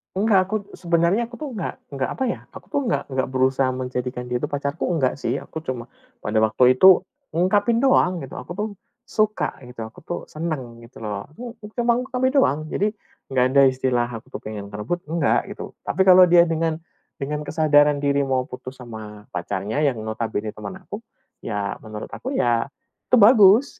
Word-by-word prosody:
Enggak, 200 0 +4
aku - - +1 0.2
sebenarnya 170 +5 +2
aku 240 +1 -8
tuh 300 - -4
enggak 190 - -4
enggak, 135 -2 -3
apa 265 - -3
ya, 235 - -2
aku - - -12
tuh - - 0
enggak 235 - -1
enggak 130 -1 -1
berusaha 130 0 +2
menjadikan 125 -1 -4
dia 125 +1 -2
itu - - +1
pacarku, 140 0 -2
enggak 140 -7 +1
sih. - - -2
Aku 160 - -8
cuma 125 -5 -4 0.3
pada 105 - -4
waktu 125 +4 +4
itu 185 +7 +8 0.3
ungkapin 205 +7 +2
doang 185 -9 +3
gitu, 135 - -8
aku - - -8
tuh 210 - 0 0.4
suka, 215 - 0
gitu, 125 -1 -12
aku 110 - -15
tuh 175 - -4
senang, 135 -8 -5
gitu 115 +2 -14
loh, 105 +2 -5
aku 235 +9 -9 0.2
cuma 235 0 +3
ngungkapin 255 +1 0
doang. 155 - +4
Jadi, 205 +6 0 0.4
nggak 130 -1 +3
ada 140 - +8
istilah 130 -2 0
aku 115 -1 -8
tuh - - -3
pengen 105 -2 -6
merebut, 105 +12 -3
enggak, 160 -2 +1
gitu. - - -7
Tapi 190 - -2
kalau 185 -1 +8
dia 170 0 +7
dengan 165 -1 0 0.4
dengan 150 +1 -3
kesadaran 145 -2 +3
diri 140 0 +2
mau 130 -1 +1
putus 125 +1 -9
sama 110 -3 -9
pacarnya 100 +7 -3
yang 140 -5 +2
notabene 110 -1 -3
teman 110 - -8
aku, 205 - -7 0.4
ya 105 -3 -3
menurut 110 -1 -8
aku 265 +2 -5
ya, 120 - +2 0.4
itu - - +5
bagus. 220 +2 +6
145 Hz, 180 wpm, -23 LUFS, 125-190 Hz, 0.4 s, itu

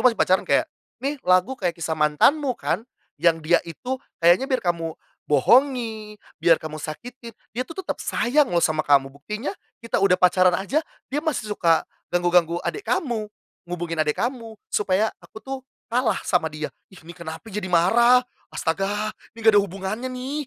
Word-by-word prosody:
masih 245 -3 +4
pacaran 185 +1 +3
kayak, - - +4 0.4
"Nih, 280 0 -2
lagu 185 +5 +3
kayak 180 -10 -2
kisah 165 -1 -3
mantanmu, 195 - +2
kan? - - -1 0.4
Yang 170 -1 +4
dia 175 +3 +5
itu 250 - -6 0.2
kayaknya 175 +11 +4
biar 260 -8 0
kamu 165 -2 -1 0.3
bohongi, 220 - +2 0.2
biar 165 -2 +5
kamu 155 -1 -7
sakitin, 230 - -8 0.2
dia, 235 - -3
tuh, 325 - -9
tetap - - -4
sayang 275 +3 +2
loh 170 -1 +2
sama 155 -1 +1
kamu. 140 -2 +3
Buktinya 210 - -5 0.3
kita 230 - 0
udah 195 -2 +4
pacaran 180 0 +4
aja 230 +11 0 0.3
dia 290 - 0
masih 265 -10 -2
suka 165 -5 +2 0.2
ganggu-ganggu 175 -1 +2
adik 415 - -4
kamu, 230 -7 -1 0.4
hubungin 170 -2 -3
adek 150 -1 +1
kamu 235 -3 -3 0.2
supaya 210 +2 +1
aku, 220 - -14
tuh, 270 0 -4 0.3
kalah 250 0 +1
sama 175 -4 +1
dia." 150 0 -6 0.2
Ih, 190 - -17
ini 170 - -9
kenapa 165 -2 -8
jadi 195 -1 -3
marah? 235 +9 +5 0.2
Astaga! 200 +5 -1 0.2
Ini - - -16
nggak 220 0 +6
ada - - +7
hubungannya, 195 +5 -4
nih! 260 +3 -4
195 Hz, 165 wpm, -23 LUFS, 170-245 Hz, 0.4 s, ada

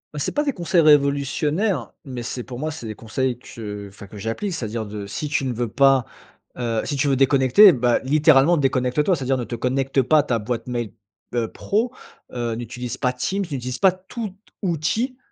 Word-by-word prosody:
Heu, - - -5
c'est - - -1
pas 295 - 0
des 285 -2 0
conseils 175 -2 +2
révolutionnaires, 150 +6 +2
mais 125 -3 -6
c'est 125 +1 -5
pour 125 0 -8
moi 155 +2 -2
c'est 120 -7 -7
des 110 - -5
conseils 125 +3 -2
que, 105 -4 -8
enfin 100 +1 -12
que 105 - -12
j'applique. 115 - -3
C'est-à-dire 110 -5 -3
de 105 -1 -6
si 145 +9 -4
tu 135 - 0
ne 130 - -1
veux 120 +1 -2
pas 135 +1 +4 0.5
heu, 115 -3 -1
si 145 - -2
tu 145 +1 +1
veux 135 - +3
déconnecter 135 - +6
bah, 120 -2 +2
littéralement 150 +3 +4
déconnecte-toi. 135 +4 +1
C'est-à-dire 135 -2 -1
ne 125 - -2
te 120 - -5
connecte 135 +3 0
pas 150 +5 +4
à - - +3
ta 120 -3 0
boîte 115 +3 -4
mail, 120 -3 -3 0.4
heu, 115 -2 -1
pro, 225 +4 -1 0.4
heu, 120 -2 -2
n'utilise 120 +1 -6
pas 125 -2 0
Teams, 195 +10 -2
n'utilise 130 -7 -4
pas 190 -2 +6
tout 190 +2 -7 0.3
outil 195 - -1
130 Hz, 200 wpm, -22 LUFS, 120-155 Hz, 0.5 s, déconnecter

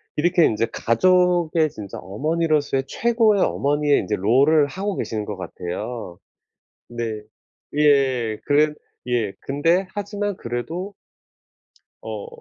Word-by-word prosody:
이렇게 175 +2 +3
인제 115 +1 +1
가족의 175 +4 +3
진짜 105 -7 -8
어머니로서의 145 - 0
최고의 225 - +2
어머니의 145 +1 +2
인제 90 - -1
롤을 140 +10 +4
하고 195 +5 -3
계시는 110 -2 -3
것 105 -2 -5
같아요. 90 +2 -6 0.7
네. 115 -2 -4 0.6
예. 130 -7 +3
그래 150 +1 +3 0.3
예 115 -5 0
근데 165 +7 +1
하지만 205 0 -3
그래도 165 - -5 1.1
어 475 - -6
145 Hz, 240 characters per minute, -22 LUFS, 115-175 Hz, 1.1 s, 롤을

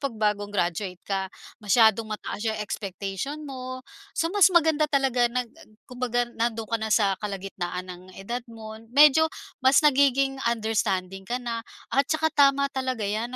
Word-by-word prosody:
'pag 275 -5 -3
bagong 210 -1 0
graduate 180 -1 -2
ka. 195 -1 -2 0.3
Masyadong 220 +1 +3
mataas 210 +1 -4
'yong 220 - -1
expectation 200 +9 -5
mo. 255 -2 -7 0.3
So 330 +2 0
mas 400 -2 +6
maganda 320 -4 +3
talaga 265 -4 +2
nag 245 -1 -3
ag 325 -4 -18
kumbaga 245 -1 -1
nandoon 230 -1 -2
ka 230 +1 -2
na 220 - -2
sa 205 -2 +3
kalagitnaan 190 -3 -5
ng 180 0 -12
edad 235 +6 -4
mo. 220 -1 -9 0.2
Medyo 300 +5 +6 0.3
mas 265 +3 +4
nagiging 275 -1 +3
understanding 195 -4 -1
ka 245 - -2
na 235 -1 -3 0.3
at 275 +1 +3
saka 315 0 +1
tama 280 -2 +4
talaga 260 -4 -2
'yan 215 +4 -2
235 Hz, 155 wpm, -25 LUFS, 205-275 Hz, 0.3 s, mas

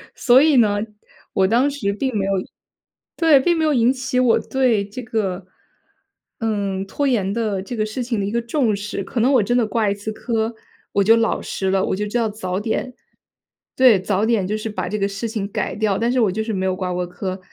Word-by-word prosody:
所 255 +1 +5
以 300 -2 +4
呢， 210 -4 +4 0.6
我 190 -1 +3
当 240 +7 +3
时 220 -9 -2
并 260 +2 -2
没 195 - 0
有 195 - -1 0.8
对， 320 -4 +5
并 340 +5 +2
没 320 - 0
有 305 -1 +2
引 240 -1 +4
起 255 -1 -2
我 250 -2 +4
对 245 -6 +1
这 215 +5 -7
个， 195 -5 -2 0.9
嗯， 200 -4 -2
拖 280 +8 -2
延 200 -7 0
的 215 -4 -1
这 195 +6 -6
个 215 -2 0
事 215 +4 -4
情 235 -3 -2
的 200 - -1
一 205 - -3
个 235 - 0
重 235 -2 0
视。 200 -1 -5
可 235 - -4
能 250 +5 +3
我 245 -6 +4
真 245 +4 +1
的 235 - +2
挂 220 -2 0
一 200 - +1
次 205 +2 -5
科 225 0 -2 0.4
我 200 - +3
就 225 +3 +6
老 230 0 0
实 190 - -3
了， 195 -1 +2
我 - - -1
就 210 +2 -2
知 210 - -1
道 230 -2 +1
早 185 -3 -4
点 235 +4 -3 0.8
对， 250 -6 +6
早 200 +2 0
点 220 -4 +1
就 210 +3 -2
是 215 +1 -5
把 210 - -4
这 210 - -2
个 200 - +1
事 200 +3 -4
情 215 -3 -4
改 - - -2
掉， 210 -2 0
但 235 +1 0
是 255 - +1
我 215 -6 +3
就 220 +3 -2
是 225 - -4
没 190 -1 -1
有 185 - 0
挂 185 -1 -3
过 180 0 -2
科， 185 +1 -5
220 Hz, 255 characters per minute, -21 LUFS, 200-245 Hz, 0.9 s, 就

